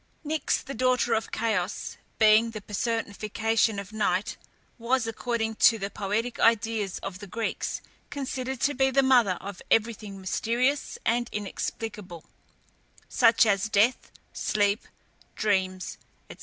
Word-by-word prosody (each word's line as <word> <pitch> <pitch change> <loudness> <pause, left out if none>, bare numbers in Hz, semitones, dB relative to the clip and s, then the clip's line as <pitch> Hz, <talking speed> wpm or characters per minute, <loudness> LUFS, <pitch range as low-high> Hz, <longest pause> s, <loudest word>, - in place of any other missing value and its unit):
Nyx, 310 +1 0
the 275 - -7
daughter 250 -1 +2
of 225 0 -1
Chaos, 210 -4 -2 0.2
being 220 +1 +5
the 215 -2 -7
personification 220 +1 -1
of 200 +1 -7
Night, 205 -1 0 0.4
was, 240 +1 +1
according 225 0 -2
to 230 - +6
the 200 -1 -4
poetic 215 +4 -2
ideas 225 -3 +2
of 185 -1 -6
the 205 - -9
Greeks, 225 +4 -3 0.3
considered 265 -2 -4
to 290 - +2
be 265 0 +2
the 270 +1 +3
mother 240 -8 +4
of 200 -2 -8
everything 215 -3 0
mysterious 240 +8 0
and 240 +1 +1
inexplicable, 205 -3 -5 0.9
such 230 +1 +5
as 200 0 +1
death, 215 +5 +2 0.2
sleep, 205 0 0 0.5
dreams, 190 -3 -1 0.3
&c. - - -11
220 Hz, 130 wpm, -27 LUFS, 205-235 Hz, 0.9 s, to